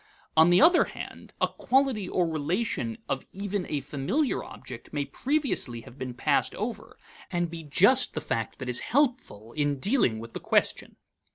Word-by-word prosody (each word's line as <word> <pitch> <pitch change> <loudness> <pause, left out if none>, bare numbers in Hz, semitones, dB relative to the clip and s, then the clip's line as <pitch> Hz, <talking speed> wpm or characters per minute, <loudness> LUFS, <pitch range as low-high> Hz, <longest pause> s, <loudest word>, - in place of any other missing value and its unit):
On 160 +2 +7
the 175 - +6
other 345 +2 +6
hand, - - -9
a - - +3
quality 260 -7 +1
or 180 - +1
relation 180 +9 -1
of 135 - -2
even 200 -1 -3
a 145 -2 -1
familiar 145 - -1
object 125 -2 -10
may 145 -1 -1
previously 265 - -1
have 120 +3 -14
been 125 -2 -5
passed - - +1
over, - - -5 0.3
and 175 -1 -1
be 165 -1 -6
just 200 - +4
the - - 0
fact 115 -1 -3
that 130 - -6
is 125 0 +1
helpful 240 - 0
in 145 -2 0
dealing 195 - +2
with 115 +1 -9
the - - -4
question. - - 0
170 Hz, 170 wpm, -27 LUFS, -, 0.3 s, On